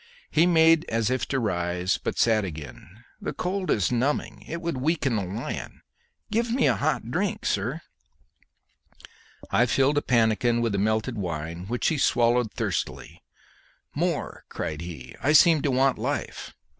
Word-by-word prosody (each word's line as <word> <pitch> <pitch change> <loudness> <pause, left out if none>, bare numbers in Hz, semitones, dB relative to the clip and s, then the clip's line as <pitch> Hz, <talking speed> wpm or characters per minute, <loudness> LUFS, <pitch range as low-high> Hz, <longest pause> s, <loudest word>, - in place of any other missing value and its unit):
He 160 +3 +4
made 165 -1 +5
as 115 0 0
if 130 - -1
to 135 - 0
rise, 90 -4 -1
but - - -4
sat 110 -2 +3
again. 80 - -9 0.2
"The - - -3
cold 185 +1 -3
is 100 -1 +2
numbing; 120 -3 -1
it 170 - -4
would 170 -5 -3
weaken 140 -2 0
a - - -2
lion. 95 +5 -6 0.5
Give 230 +1 0
me 245 +1 +2
a - - +3
hot 145 -5 -1
drink, 190 +5 -1
sir." 125 +11 -1 1.7
I 125 - +4
filled 135 +4 +3
a - - -8
pannikin 120 -1 +2
with 115 -1 0
the 100 - -1
melted 110 +3 0
wine, 85 0 -4
which 120 +3 0
he 155 - -1
swallowed 120 -3 +2
thirstily. - - -4 0.7
"More!" - - -2
cried 75 +1 -4
he. 75 -8 -8
"I 145 - +2
seem 160 0 +6
to 145 - 0
want 135 0 +2
life." - - -4
120 Hz, 155 wpm, -26 LUFS, 100-150 Hz, 1.7 s, seem